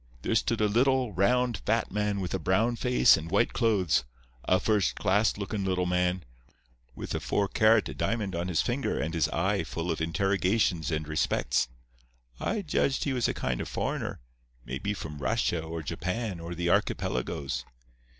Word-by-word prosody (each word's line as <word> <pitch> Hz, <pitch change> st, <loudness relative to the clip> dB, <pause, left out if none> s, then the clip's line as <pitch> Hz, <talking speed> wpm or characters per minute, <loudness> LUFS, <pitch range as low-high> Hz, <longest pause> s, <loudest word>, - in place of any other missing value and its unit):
There -, -, 0 dB
stood -, -, +1 dB
a 105 Hz, -, +4 dB
little, 125 Hz, +1 st, +2 dB
round, 120 Hz, +4 st, +2 dB
fat -, -, +1 dB
man 105 Hz, 0 st, -1 dB
with 90 Hz, -1 st, -3 dB
a 95 Hz, -, 0 dB
brown 110 Hz, +8 st, +2 dB
face 125 Hz, +1 st, +5 dB
and 80 Hz, +1 st, -6 dB
white 115 Hz, -, +2 dB
clothes, 100 Hz, -, +2 dB, 0.4 s
a 95 Hz, -, +3 dB
first 105 Hz, -5 st, +1 dB
class 105 Hz, +2 st, +2 dB
looking 100 Hz, 0 st, -3 dB
little 90 Hz, -1 st, 0 dB
man, 90 Hz, 0 st, 0 dB, 0.7 s
with -, -, -5 dB
a -, -, -1 dB
four 100 Hz, -1 st, 0 dB
karat 110 Hz, -10 st, +3 dB
diamond 100 Hz, +2 st, -1 dB
on 85 Hz, +1 st, -2 dB
his 90 Hz, -3 st, +1 dB
finger 125 Hz, +3 st, -1 dB
and 80 Hz, +1 st, -2 dB
his 80 Hz, -, +1 dB
eye -, -, 0 dB
full 85 Hz, +1 st, -3 dB
of 80 Hz, -, -3 dB
interrogations 95 Hz, 0 st, +1 dB
and 80 Hz, -2 st, -2 dB
respects. 70 Hz, -5 st, +1 dB, 0.7 s
I 215 Hz, -2 st, -1 dB
judged 140 Hz, -4 st, +1 dB
he 140 Hz, -, -1 dB
was 125 Hz, -2 st, +1 dB
a -, -, -2 dB
kind 65 Hz, -2 st, -2 dB
of -, -, -4 dB
foreigner—may -, -, -5 dB
be 105 Hz, +5 st, -2 dB
from 75 Hz, -5 st, -7 dB
Russia 80 Hz, +5 st, 0 dB
or 80 Hz, 0 st, -5 dB
Japan 90 Hz, +5 st, -3 dB
or 85 Hz, +1 st, -6 dB
the 85 Hz, +1 st, -2 dB
archipelagoes. 65 Hz, -4 st, -1 dB
95 Hz, 170 wpm, -28 LUFS, 80-110 Hz, 0.7 s, face